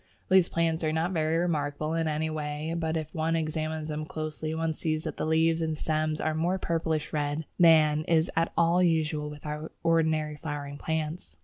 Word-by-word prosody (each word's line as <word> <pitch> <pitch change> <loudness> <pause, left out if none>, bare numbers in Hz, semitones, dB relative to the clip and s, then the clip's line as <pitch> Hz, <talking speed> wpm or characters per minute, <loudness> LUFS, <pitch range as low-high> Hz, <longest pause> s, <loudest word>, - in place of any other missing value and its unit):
These 185 -2 +6
plants 165 -1 0
are 155 - +1
not 160 +3 0
very 160 -2 +1
remarkable 155 -2 -1
in 165 -1 0
any 155 +1 -1
way, 150 +1 -3
but 160 -1 -1
if 155 -1 -5
one 160 +1 0
examines 155 -1 -2
them 155 0 -3
closely 155 0 -4
one 160 0 0
sees 155 0 -2
that - - -5
the - - -2
leaves 160 +1 +3
and 160 -1 -1
stems 155 0 -1
are 155 - 0
more 170 +4 0
purplish 160 -3 -1
red 150 +1 -1
than 155 -3 +6
is 165 0 +3
at 165 +1 +1
all 170 +2 +4
usual 155 -3 +1
with 150 0 -11
our 150 +1 -5
ordinary 160 -2 +2
flowering 145 -2 -5
plants. 155 - -3
155 Hz, 190 wpm, -28 LUFS, 155-165 Hz, -, These